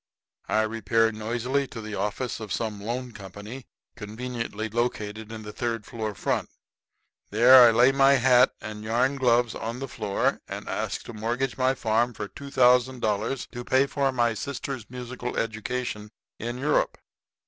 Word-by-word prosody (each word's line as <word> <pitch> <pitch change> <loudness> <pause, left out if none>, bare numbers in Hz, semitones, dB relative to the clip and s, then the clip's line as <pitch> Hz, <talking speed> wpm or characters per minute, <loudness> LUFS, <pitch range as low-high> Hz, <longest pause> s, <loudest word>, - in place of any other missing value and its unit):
I 110 - +3
repair 115 +1 +1
noisily 120 +5 -1
to 115 - -8
the 110 -1 -7
office 105 +5 -2
of 110 -3 -7
some 110 -3 -2
loan 120 +4 -4
company 105 +5 -9 0.3
conveniently 110 0 -5
located 110 -1 -3
in 110 -1 -7
the 105 0 -8
third 115 -2 -3
floor, 110 -3 -4
front. - - -1 0.8
There 120 +3 +8
I - - +7
lay 120 +3 +5
my 135 0 +5
hat 125 -1 +5
and 105 0 -7
yarn 120 +5 +1
gloves 120 -3 +3
on 115 +2 -4
the 135 +1 -5
floor 105 -6 -1
and - - -7
ask - - -3
to - - -9
mortgage 120 +4 -2
my 130 0 +2
farm 115 0 +1
for 105 - -4
$2,000 125 -3 +1
to 120 - -6
pay 130 +2 +3
for 140 -1 0
my 120 -2 +1
sister's 130 -1 -5
musical 125 0 -6
education 110 -1 -3 0.3
in 120 +2 -4
Europe. 145 +3 +1
120 Hz, 155 wpm, -26 LUFS, 110-125 Hz, 0.8 s, There